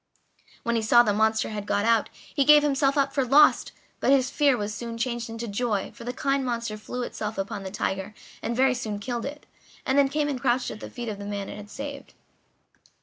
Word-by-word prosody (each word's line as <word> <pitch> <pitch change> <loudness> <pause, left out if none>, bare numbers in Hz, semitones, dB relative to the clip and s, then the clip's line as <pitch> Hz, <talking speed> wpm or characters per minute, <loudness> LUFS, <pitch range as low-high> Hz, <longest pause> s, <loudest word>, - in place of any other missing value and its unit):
When 235 0 0
he 225 - +1
saw 240 +2 +6
the 210 -3 +1
monster 220 +1 +2
had 210 -1 -5
got 205 - +1
out 230 -2 +3 0.2
he 280 - +3
gave 295 +1 +7
himself 275 -1 +2
up 275 -1 +2
for 275 - +2
lost, 285 +4 +5 0.3
but - - +1
his 270 -2 +4
fear 285 -4 +3
was 210 -1 -3
soon 230 +2 -6
changed 235 -1 -2
into 230 +1 -5
joy, 210 -1 -1
for 235 - -11
the 245 - -2
kind 275 +1 0
monster 235 -3 -2
threw 245 +4 -5
itself 215 -2 -5
upon 200 +1 -3
the 190 - -6
tiger 190 +1 -3 0.3
and 235 - -2
very 260 +1 +4
soon 220 -4 -4
killed 235 +3 -4
it, 290 +1 -9 0.4
and 265 +2 +3
then 275 -1 +4
came 295 +1 0
and 270 -4 -3
crouched 250 0 +1
at 215 - -8
the - - -8
feet 240 -1 -7
of 205 -2 -5
the 200 - -6
man 200 -1 -4
it - - -7
had 210 0 -10
saved. 280 +3 -8
235 Hz, 230 wpm, -26 LUFS, 215-270 Hz, 0.4 s, gave